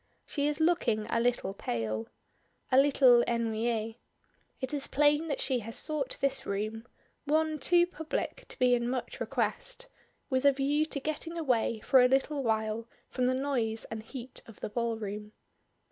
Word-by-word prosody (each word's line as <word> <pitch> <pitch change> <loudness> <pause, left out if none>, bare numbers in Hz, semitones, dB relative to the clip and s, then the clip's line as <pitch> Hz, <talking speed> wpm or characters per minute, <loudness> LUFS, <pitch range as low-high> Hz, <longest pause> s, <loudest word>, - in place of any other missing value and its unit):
She 285 -1 -1
is 295 0 -1
looking 315 -10 +2
a 230 - +2
little 235 -5 0
pale. 110 - -3 0.6
A 255 - +5
little 265 -4 +6
ennuyée; 225 -1 -1 0.6
it 260 +1 -3
is 285 -2 0
plain 295 +2 +3
that 285 - -2
she 260 -2 0
has 230 0 -3
sought 300 -4 -1
this 275 -1 0
room 215 +4 -3 0.4
one 310 +1 +1
too 350 +4 +4
public 320 -3 -4
to - - -6
be 250 -1 +4
in 240 0 +1
much 260 - -4
request - - -2 0.4
with 260 -1 0
a 280 - +7
view 290 +3 +1
to 290 - -3
getting 310 +4 -4
away 235 -7 0
for 260 +2 +5
a 250 - +6
little 275 +2 +1
while 220 -1 -1 0.2
from 250 -1 0
the 255 - +2
noise 245 -5 -1
and 220 -1 -4
heat 245 +2 -9
of 225 - -14
the - - -3
ballroom. 215 -2 -3
255 Hz, 165 wpm, -30 LUFS, 225-290 Hz, 0.6 s, a